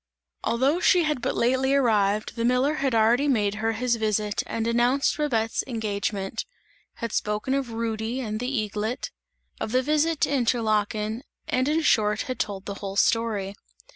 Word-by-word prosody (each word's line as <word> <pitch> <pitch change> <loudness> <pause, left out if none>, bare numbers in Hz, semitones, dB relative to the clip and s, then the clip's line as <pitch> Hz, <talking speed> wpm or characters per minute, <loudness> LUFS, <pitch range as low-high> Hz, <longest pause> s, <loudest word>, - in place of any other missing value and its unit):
Although 270 +8 +2
she 360 -1 +4
had 300 -5 -1
but - - -1
lately 260 +3 +2
arrived, 215 -5 +2
the 230 - -2
miller 250 +4 +2
had 270 -4 +1
already 235 +6 +4
made 210 -7 +2
her 225 0 +1
his 240 +1 0
visit 215 -1 0
and 225 -1 -2
announced 240 +4 +2
Babette's 230 -7 0
engagement; 205 -3 -2 0.5
had 230 -2 -5
spoken 210 +5 -1
of 275 -3 -1
Rudy 225 +1 -2
and 215 -4 -3
the 250 +2 -2
eaglet; 215 0 -2 0.5
of - - -3
the 255 +1 +3
visit 305 +2 +1
to - - +2
Interlaken 220 -3 0 0.3
and 255 +1 +1
in 310 +2 +2
short 210 -6 +3
had 255 -2 -4
told 200 -2 -3
the 200 - -4
whole 195 -1 -5
story. 210 -3 +1
230 Hz, 165 wpm, -25 LUFS, 215-260 Hz, 0.5 s, she